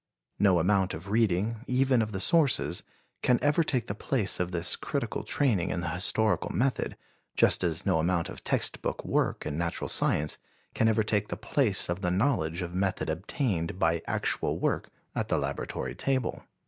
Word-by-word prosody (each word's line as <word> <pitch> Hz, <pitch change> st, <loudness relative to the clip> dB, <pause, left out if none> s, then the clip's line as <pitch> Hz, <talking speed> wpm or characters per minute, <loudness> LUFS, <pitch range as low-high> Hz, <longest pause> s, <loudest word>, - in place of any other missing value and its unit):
No 95 Hz, -3 st, +5 dB
amount 95 Hz, +2 st, +2 dB
of 85 Hz, +6 st, -8 dB
reading, 110 Hz, 0 st, +1 dB
even 130 Hz, -1 st, +3 dB
of 110 Hz, -1 st, -2 dB
the 95 Hz, -, -3 dB
sources, 150 Hz, -, +2 dB, 0.4 s
can 125 Hz, -, +4 dB
ever 145 Hz, +3 st, +3 dB
take 130 Hz, -7 st, 0 dB
the 100 Hz, -, -3 dB
place 105 Hz, -1 st, -1 dB
of 90 Hz, 0 st, -1 dB
this 85 Hz, -2 st, +1 dB
critical -, -, -3 dB
training 110 Hz, -, +1 dB
in 90 Hz, -, -2 dB
the 85 Hz, -, -2 dB
historical 90 Hz, +2 st, +1 dB
method, 130 Hz, +1 st, -1 dB, 0.4 s
just -, -, +5 dB
as 80 Hz, -3 st, 0 dB
no 80 Hz, -, +2 dB
amount 85 Hz, +1 st, +1 dB
of 95 Hz, -, -9 dB
text -, -, 0 dB
book -, -, -3 dB
work -, -, 0 dB
in 75 Hz, -, -3 dB
natural 85 Hz, -1 st, -2 dB
science 75 Hz, +1 st, +1 dB, 0.3 s
can 110 Hz, -, +2 dB
ever 110 Hz, 0 st, +3 dB
take 105 Hz, -1 st, 0 dB
the -, -, -5 dB
place 115 Hz, -9 st, +1 dB
of 85 Hz, +2 st, -3 dB
the 90 Hz, -, 0 dB
knowledge 90 Hz, -, +1 dB
of 90 Hz, 0 st, -6 dB
method 95 Hz, -3 st, 0 dB
obtained 90 Hz, -, -2 dB
by 85 Hz, -2 st, +1 dB
actual -, -, 0 dB
work -, -, -1 dB, 0.2 s
at -, -, -2 dB
the -, -, +1 dB
laboratory -, -, -3 dB
table. 130 Hz, -3 st, -2 dB
95 Hz, 180 wpm, -28 LUFS, 85-115 Hz, 0.4 s, No